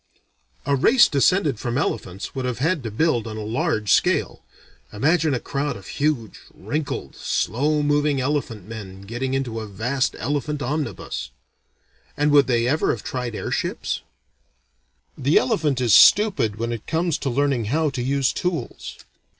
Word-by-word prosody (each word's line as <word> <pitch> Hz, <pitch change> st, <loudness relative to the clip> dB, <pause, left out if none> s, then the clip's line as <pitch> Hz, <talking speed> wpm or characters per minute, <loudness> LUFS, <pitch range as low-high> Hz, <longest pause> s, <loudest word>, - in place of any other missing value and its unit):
A 140 Hz, -, +2 dB
race 235 Hz, -, +5 dB
descended 145 Hz, -, +2 dB
from 120 Hz, 0 st, -2 dB
elephants 100 Hz, -8 st, -3 dB
would 130 Hz, -, -3 dB
have 125 Hz, -3 st, -2 dB
had 160 Hz, +5 st, 0 dB
to 115 Hz, -, -4 dB
build 120 Hz, -1 st, 0 dB
on 110 Hz, -1 st, -6 dB
a 110 Hz, -, -4 dB
large 110 Hz, -1 st, -1 dB
scale. -, -, +1 dB, 0.5 s
Imagine 155 Hz, +6 st, +2 dB
a -, -, -1 dB
crowd 140 Hz, -1 st, -3 dB
of 95 Hz, -, -13 dB
huge, 140 Hz, -8 st, -2 dB, 0.2 s
wrinkled, 140 Hz, +9 st, -4 dB
slow 145 Hz, +9 st, 0 dB
moving 145 Hz, -1 st, +2 dB
elephant 130 Hz, -8 st, -2 dB
men 100 Hz, -4 st, -8 dB
getting 125 Hz, +6 st, -3 dB
into 120 Hz, -4 st, -2 dB
a 110 Hz, -, -6 dB
vast 125 Hz, +7 st, -1 dB
elephant 145 Hz, +4 st, -2 dB
omnibus. 135 Hz, -, -3 dB, 0.9 s
And 145 Hz, +1 st, +2 dB
would 145 Hz, -2 st, +5 dB
they 120 Hz, -2 st, +2 dB
have 140 Hz, +6 st, +1 dB
ever -, -, +2 dB
tried 125 Hz, -3 st, -5 dB
airships? -, -, -2 dB, 1.1 s
The 140 Hz, +5 st, +2 dB
elephant 155 Hz, -, +1 dB
is 120 Hz, -4 st, +2 dB
stupid 195 Hz, -, +6 dB
when 115 Hz, +2 st, -3 dB
it 115 Hz, -2 st, -6 dB
comes 165 Hz, 0 st, 0 dB
to 135 Hz, -, -2 dB
learning 135 Hz, -2 st, +1 dB
how 150 Hz, +6 st, +1 dB
to 130 Hz, -, -4 dB
use 135 Hz, +1 st, +1 dB
tools. 180 Hz, -3 st, -4 dB
130 Hz, 155 wpm, -23 LUFS, 115-150 Hz, 1.1 s, stupid